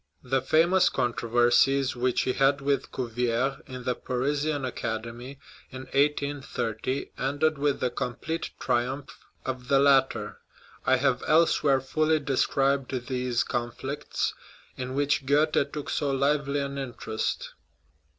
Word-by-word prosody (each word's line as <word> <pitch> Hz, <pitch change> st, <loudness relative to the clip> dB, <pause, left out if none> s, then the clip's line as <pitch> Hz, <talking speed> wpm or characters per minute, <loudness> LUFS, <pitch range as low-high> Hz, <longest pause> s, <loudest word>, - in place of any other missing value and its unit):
The 130 Hz, 0 st, +1 dB
famous 170 Hz, +7 st, +4 dB
controversies 120 Hz, +3 st, +2 dB
which 125 Hz, 0 st, +1 dB
he 130 Hz, -, 0 dB
had 135 Hz, +2 st, +3 dB
with 140 Hz, 0 st, -1 dB
Cuvier 125 Hz, +3 st, -1 dB
in 125 Hz, -1 st, -7 dB
the 125 Hz, -, 0 dB
Parisian 145 Hz, +4 st, -1 dB
Academy 120 Hz, +2 st, -5 dB, 0.3 s
in 130 Hz, 0 st, -8 dB
1830 140 Hz, -3 st, -1 dB
ended 145 Hz, +3 st, +1 dB
with 145 Hz, -1 st, 0 dB
the 125 Hz, -, +1 dB
complete 155 Hz, +9 st, -3 dB
triumph 130 Hz, +3 st, -2 dB, 0.3 s
of 130 Hz, -2 st, -4 dB
the 135 Hz, -, +4 dB
latter. 135 Hz, -1 st, +3 dB, 0.5 s
I -, -, +6 dB
have -, -, +1 dB
elsewhere 150 Hz, -4 st, +4 dB
fully 155 Hz, +4 st, +1 dB
described 135 Hz, -2 st, 0 dB
these 125 Hz, -2 st, 0 dB
conflicts, 120 Hz, +4 st, -3 dB, 0.4 s
in 130 Hz, 0 st, -5 dB
which 140 Hz, -1 st, +1 dB
Goethe 150 Hz, +1 st, +2 dB
took 150 Hz, -2 st, -5 dB
so 145 Hz, -, 0 dB
lively 140 Hz, +1 st, +1 dB
an 140 Hz, 0 st, -4 dB
interest. 120 Hz, -4 st, -4 dB
135 Hz, 120 wpm, -27 LUFS, 125-145 Hz, 0.5 s, I